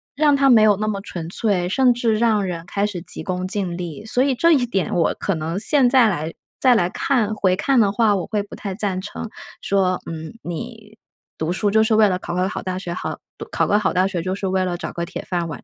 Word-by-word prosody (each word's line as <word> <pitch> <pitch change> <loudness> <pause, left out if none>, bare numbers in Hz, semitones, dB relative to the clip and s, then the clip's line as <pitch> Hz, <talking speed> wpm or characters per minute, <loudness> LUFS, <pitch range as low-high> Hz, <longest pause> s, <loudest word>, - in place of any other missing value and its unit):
让 295 0 +3
它 275 -1 +4
没 225 -3 +7
有 210 -2 +5
那 215 +1 -2
么 200 -2 -2
纯 175 -5 -7
粹， 190 -2 0
甚 250 +6 +3
至 235 -2 +1
让 220 -3 +2
人 170 -3 -4
开 200 +2 -1
始 200 -4 -4
急 - - -4
功 185 0 -3
近 190 -3 -2
利， 175 +3 -6
所 245 +3 +2
以， 270 -1 +1
这 335 +7 +3
一 280 -6 +4
点 195 -6 -1
我 170 -2 +1
可 195 - -1
能 165 +2 -3
现 260 +3 +4
在 250 -3 +5
来 160 -4 -3 0.3
再 255 -2 +5
来 175 -6 +2
看， 230 -6 0
回 190 -3 +1
看 250 +7 +2
的 205 -3 +3
话， 215 -1 +2
我 185 - -3
会 210 -2 -1
不 200 - -11
太 195 -2 -5
赞 195 -3 0
成 210 +4 -6 0.3
说， 190 -2 +1
嗯， 160 +5 -7
你 220 +4 -8 0.4
读 160 +1 -1
书 205 +3 0
就 220 +1 +4
是 220 0 +2
为 215 -1 +5
了 185 -2 -1
考 175 - -5
个 180 +1 +1
好 - - -5
大 185 -1 -4
学， 180 -2 -5
好 - - -5 0.2
读 - - -7
考 - - +1
个 205 - +2
好 200 - 0
大 185 +1 +2
学 185 -3 -3
就 185 +2 -2
是 200 - -4
为 190 0 +1
了 180 -1 -2
找 - - -6
个 170 - -3
铁 - - -7
饭 175 -2 -2
碗， 155 - -8
200 Hz, 275 characters per minute, -21 LUFS, 180-220 Hz, 0.4 s, 没